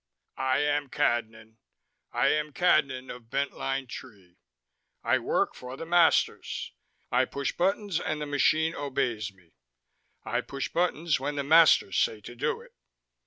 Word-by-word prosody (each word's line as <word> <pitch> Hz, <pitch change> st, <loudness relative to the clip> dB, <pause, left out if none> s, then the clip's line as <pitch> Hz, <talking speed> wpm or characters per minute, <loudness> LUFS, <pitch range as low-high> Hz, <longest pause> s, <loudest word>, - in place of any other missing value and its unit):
"I 130 Hz, 0 st, +2 dB
am 145 Hz, -1 st, 0 dB
Cadnan, 110 Hz, -5 st, -1 dB, 0.5 s
I -, -, +2 dB
am 150 Hz, -1 st, 0 dB
Cadnan 135 Hz, -7 st, +2 dB
of 115 Hz, -2 st, -16 dB
Bent 140 Hz, +2 st, -1 dB
Line 135 Hz, 0 st, -3 dB
Tree, 100 Hz, -8 st, -12 dB, 0.6 s
I -, -, +2 dB
work -, -, 0 dB
for 125 Hz, +1 st, -9 dB
the 165 Hz, -, -6 dB
masters, 170 Hz, 0 st, +2 dB, 0.4 s
I -, -, +3 dB
push 140 Hz, 0 st, -3 dB
buttons 195 Hz, 0 st, 0 dB
and 155 Hz, -, -3 dB
the 150 Hz, -, -3 dB
machine 155 Hz, +3 st, +2 dB
obeys 130 Hz, -8 st, -2 dB
me, 90 Hz, -4 st, -26 dB, 0.7 s
I -, -, -1 dB
push 135 Hz, -1 st, -5 dB
buttons 170 Hz, -3 st, 0 dB
when 145 Hz, +2 st, -3 dB
the 140 Hz, -, -1 dB
masters 155 Hz, -, +5 dB
say 110 Hz, -, +1 dB
to 120 Hz, -, -10 dB
do -, -, -2 dB
it. -, -, -16 dB
140 Hz, 150 wpm, -28 LUFS, 120-155 Hz, 0.7 s, masters